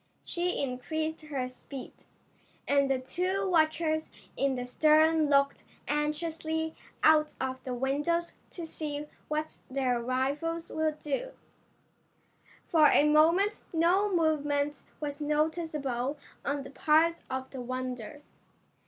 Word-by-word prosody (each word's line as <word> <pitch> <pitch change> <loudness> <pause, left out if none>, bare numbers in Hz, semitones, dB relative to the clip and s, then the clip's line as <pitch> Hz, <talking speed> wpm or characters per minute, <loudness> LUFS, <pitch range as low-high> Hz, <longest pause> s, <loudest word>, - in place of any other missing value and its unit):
She 355 +1 -1
increased 310 +5 -2
her 280 -5 -3
speed, 255 +1 -9 0.7
and 280 -1 +3
the 270 - +3
two 370 +9 -1
watchers 315 -2 +2 0.3
in 275 -1 +1
the 250 -1 -3
stern 310 +3 +4
looked 280 -1 +3 0.2
anxiously 320 +2 -1 0.3
out 305 -1 +5
of 260 0 -3
the 255 -1 -3
windows 295 +7 0 0.2
to 345 - -7
see 300 -2 -5 0.2
what 305 +1 -3
their 255 -2 0
rivals 280 +7 -1
would 315 -1 0
do. 305 - -3 1.3
For 310 -3 +5
a - - +5
moment 335 +7 +4
no 360 +5 +3
movement 295 -4 +1 0.2
was 290 -1 -4
noticeable 300 -3 -1 0.3
on 280 0 -1
the 270 - -10
part 315 +4 +3
of 260 0 -4
the 265 - -6
Wonder. 255 +2 -5
300 Hz, 120 wpm, -30 LUFS, 270-320 Hz, 1.3 s, out